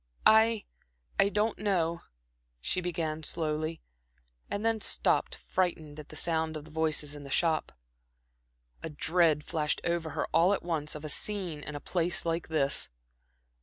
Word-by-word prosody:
"I 220 -1 +5 0.5
I 200 - +6
don't 210 +2 0
know," 170 -5 0 0.6
she 120 - -1
began 160 -3 -2
slowly, 155 0 -1 0.7
and 205 +2 -2
then 225 -1 +1
stopped - - +2
frightened 160 -5 -2
at 150 - -10
the - - -10
sound 160 0 0
of 150 - -9
voices 155 -2 0
in 145 -1 -9
the 140 - -9
shop. 160 +2 +1 1.1
A - - -4
dread 155 0 +2
flashed 150 -2 -1
over 170 -1 -1
her - - +1
all 180 +4 +5
at - - -7
once 155 -4 -2
of 150 0 -7
a - - -4
scene 180 -1 -3
in 150 0 -7
a - - -3
place 175 +2 -1
like 165 0 -1
this. 150 -4 +1
160 Hz, 155 wpm, -30 LUFS, 155-180 Hz, 1.1 s, I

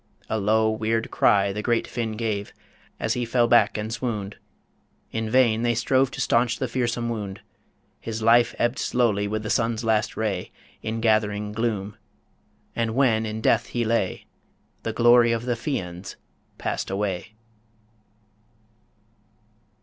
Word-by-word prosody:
A 110 - +1
low, 110 +2 +2
weird 110 +1 -1
cry 100 -3 +3
The 105 - -3
great 120 +1 +1
Finn 115 -2 -3
gave, 105 -2 -3 0.5
as - - 0
he 125 - -2
fell 120 0 +2
back 110 -4 +4
and 110 +1 -3
swooned 110 -4 -4 0.7
In 110 -1 -2
vain 115 -2 +3
they 120 0 +1
strove 130 +3 +2
to 135 - -9
stanch 120 -2 +2
the 130 - -2
fearsome 120 -1 -1
wound 105 -3 -4 0.6
His 115 -1 -5
life 115 +1 +4
ebbed 120 +2 0
slowly 105 -5 +1
with 110 +1 -3
the 105 - -3
sun's 115 0 0
last 110 -1 0
ray 105 -5 -2 0.3
In 115 +1 -3
gathering 105 -2 +1
gloom... 105 -2 -2 0.8
And 115 -1 -1
when 115 -5 +2
in 110 +1 -4
death 115 +2 +2
he 120 -1 -2
lay, 110 -4 -1 0.6
The 115 - -3
glory 120 +1 +5
of 115 +1 -3
the 125 - +1
Fians 95 - -4 0.4
passed - - -3
away. 100 0 -3
115 Hz, 145 wpm, -24 LUFS, 105-120 Hz, 0.8 s, glory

